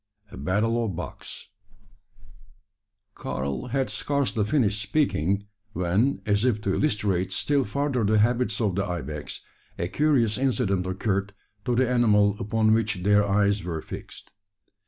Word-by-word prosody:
A - - -9
BATTLE 115 +5 0
OF 100 -6 -3
BUCKS. 90 - -7 1.6
Karl 70 - -4
had 130 +1 0
scarcely 140 -6 0
finished 105 -4 +1
speaking, 100 - 0 0.3
when, 95 +10 +1
as 105 0 +1
if 120 -4 +2
to 100 -2 0
illustrate 100 -9 0
still 140 -3 +1
further 135 +2 -1
the 110 +1 +3
habits 120 0 +2
of 105 -5 +1
the 100 +2 0
ibex, 75 -5 -5 0.4
a 85 - -1
curious 125 -3 +2
incident 115 -9 +1
occurred 100 +1 -1 0.3
to 120 - +1
the 130 +1 +3
animal 105 -5 +3
upon, 110 0 +2
which 105 -5 0
their 105 +1 +4
eyes 100 0 +2
were 85 -2 -3
fixed. - - -9
105 Hz, 135 wpm, -26 LUFS, 100-120 Hz, 1.6 s, their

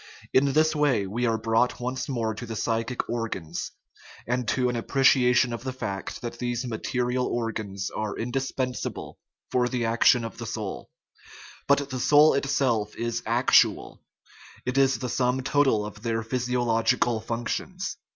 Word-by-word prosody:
In 135 +1 +4
this 155 +1 +3
way 145 -9 +2
we 120 +6 -1
are 115 -1 +1
brought 115 +2 +1
once 125 +3 -3
more 115 -4 -1
to 120 +3 -8
the 115 - -5
psychic 115 +3 -2
organs, 115 -9 -4 0.6
and 125 0 -1
to 125 +3 +1
an 125 - -1
appreciation 125 0 +3
of 115 - -6
the 130 - -3
fact 100 -7 -5
that 120 0 -6
these 120 0 -2
material 125 +2 -1
organs 105 -4 -3
are 110 -1 -4
indispensable 130 0 -3 0.3
for 125 -1 +2
the 125 -2 -1
action 115 +1 +4
of 115 - -8
the 115 - -5
soul; 105 -3 -5 0.8
but 140 0 +2
the 130 - -3
soul 150 +4 +6
itself 130 -6 0
is 115 0 -2
actual 120 +3 +3 0.6
it 125 +1 -2
is 135 0 +4
the 125 - -4
sum 125 +1 0
total 135 -6 +2
of 105 0 -9
their 115 -1 -1
physiological 120 -1 +1
functions. 120 - -4
120 Hz, 150 wpm, -26 LUFS, 115-130 Hz, 0.8 s, soul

